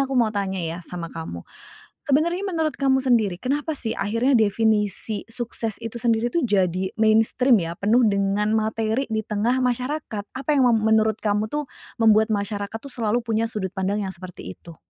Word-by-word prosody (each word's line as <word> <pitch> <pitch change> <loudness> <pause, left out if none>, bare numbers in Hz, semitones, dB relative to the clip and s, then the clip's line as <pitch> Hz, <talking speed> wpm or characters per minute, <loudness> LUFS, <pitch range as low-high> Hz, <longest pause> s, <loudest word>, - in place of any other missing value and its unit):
aku 270 -1 0
mau 230 -3 +3
tanya 190 -3 -2
ya 165 +2 -4
sama 170 -1 -7
kamu. 160 - -7 0.6
Sebenarnya 335 +7 +1
menurut 320 -6 -1
kamu 265 -1 +2
sendiri, 225 -8 +1
kenapa 290 +5 -1
sih 230 -6 -4
akhirnya 230 +7 +2
definisi 215 -1 +1
sukses 230 -2 -5
itu 230 0 -6
sendiri 235 0 +1
tuh 335 +2 0
jadi 190 -4 +1
mainstream 225 +3 +4
ya? 165 - -4
Penuh 230 +5 +4
dengan 200 0 +1
materi 220 +3 0
di 220 -1 -2
tengah 220 +4 0
masyarakat. 250 -3 -2
Apa 265 +2 -7
yang 265 -4 +4
mem 235 - +4
menurut 220 -1 +3
kamu 210 0 -1
tuh, 295 +5 -2 0.3
membuat 220 -1 +4
masyarakat 205 0 -2
tuh 265 +4 -10
selalu 230 0 -1
punya 225 0 0
sudut 195 -4 -4
pandang 200 +2 -1
yang 190 - -4
seperti 180 - -9
itu? 170 - -14
220 Hz, 175 wpm, -23 LUFS, 200-245 Hz, 0.6 s, mainstream